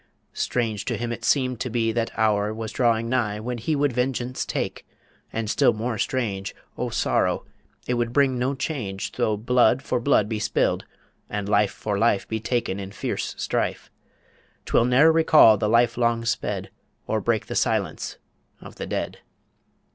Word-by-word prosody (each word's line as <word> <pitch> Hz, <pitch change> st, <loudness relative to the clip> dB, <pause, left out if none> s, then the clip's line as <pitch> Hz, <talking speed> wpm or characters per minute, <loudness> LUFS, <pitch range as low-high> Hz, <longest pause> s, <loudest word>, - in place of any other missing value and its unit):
strange 110 Hz, -5 st, -1 dB
to -, -, -2 dB
him 120 Hz, 0 st, -3 dB
it 120 Hz, 0 st, -6 dB
seemed 130 Hz, -2 st, +1 dB
to 125 Hz, -, -2 dB
be 115 Hz, -1 st, 0 dB
That 115 Hz, 0 st, -1 dB
hour 105 Hz, -1 st, +2 dB
was 110 Hz, -1 st, -5 dB
drawing 115 Hz, -2 st, +1 dB
nigh 115 Hz, -4 st, 0 dB
when 120 Hz, +2 st, -4 dB
he 155 Hz, +8 st, -1 dB
Would 145 Hz, -2 st, +1 dB
vengeance 125 Hz, 0 st, -2 dB
take... -, -, -3 dB, 0.5 s
And 115 Hz, -1 st, -3 dB
still -, -, +3 dB
more 110 Hz, 0 st, -3 dB
strange, 100 Hz, -7 st, -2 dB, 0.2 s
O -, -, -2 dB
sorrow! -, -, 0 dB, 0.4 s
it 125 Hz, -, -1 dB
would 120 Hz, -1 st, 0 dB
bring 130 Hz, -1 st, +2 dB
no 130 Hz, +3 st, 0 dB
change 110 Hz, -9 st, -4 dB
Though 105 Hz, -1 st, 0 dB
blood 125 Hz, +3 st, +3 dB
for 125 Hz, -, -1 dB
blood 120 Hz, -5 st, +3 dB
be 110 Hz, -1 st, -3 dB
spilled, 110 Hz, -, 0 dB, 0.4 s
and 105 Hz, -1 st, -3 dB
life 105 Hz, -1 st, +3 dB
For 100 Hz, -2 st, -3 dB
life 110 Hz, -3 st, +2 dB
be 110 Hz, -, -2 dB
taken 115 Hz, -4 st, -1 dB
in 95 Hz, -1 st, -6 dB
fierce -, -, -3 dB
strife; -, -, -2 dB, 0.7 s
'Twill 115 Hz, -, +3 dB
ne'er 130 Hz, +6 st, +5 dB
recall 155 Hz, -8 st, +6 dB
the 105 Hz, +1 st, 0 dB
life 115 Hz, +1 st, +3 dB
long 115 Hz, -1 st, +1 dB
sped, 115 Hz, -, -2 dB, 0.3 s
Or -, -, -1 dB
break -, -, 0 dB
the -, -, -6 dB
silence -, -, -1 dB, 0.4 s
of -, -, -12 dB
the -, -, -5 dB
dead. -, -, -3 dB
115 Hz, 170 wpm, -24 LUFS, 110-125 Hz, 0.7 s, recall